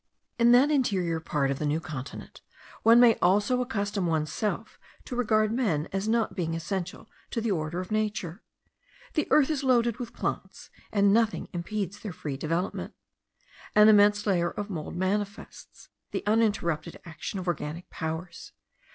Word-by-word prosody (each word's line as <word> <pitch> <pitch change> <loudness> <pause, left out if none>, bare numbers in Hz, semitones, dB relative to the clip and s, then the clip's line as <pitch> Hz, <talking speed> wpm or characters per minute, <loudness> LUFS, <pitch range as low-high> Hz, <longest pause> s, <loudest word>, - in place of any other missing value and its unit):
In 235 0 +6
that 270 +5 +5
interior 190 - +1
part 145 -3 -1
of 135 - -3
the 150 - -1
New 150 +2 +1
Continent 150 -6 -8 0.4
one 230 +1 +7
may 240 -2 +6
almost 200 +5 +3
accustom 205 -7 -1
oneself 160 +6 -2 0.3
to 250 - -5
regard 215 -3 +2
men 205 - 0
as 195 +2 -1
not 225 0 +1
being 165 -3 -2
essential 180 +2 -4 0.2
to - - -2
the 225 -1 -1
order 165 -1 -2
of 185 +2 -6
nature. 210 -4 -2 0.7
The 305 - 0
earth 300 0 +4
is 285 -2 -2
loaded 240 -3 +2
with 240 -1 -6
plants, - - -5 0.2
and 200 -1 +4
nothing 225 0 +1
impedes 195 +2 -4
their 205 -5 -6
free 145 -3 -5
development. 165 +7 -3 0.8
An 210 +1 +8
immense 205 0 +5
layer 175 -4 +2
of 205 0 -6
mould 160 -4 -5
manifests 200 +3 -4 0.2
the - - -4
uninterrupted 200 -7 0
action 170 +4 -6
of 185 -1 -5
organic 165 0 -3
powers. 160 +2 -6
200 Hz, 155 wpm, -27 LUFS, 170-220 Hz, 0.8 s, An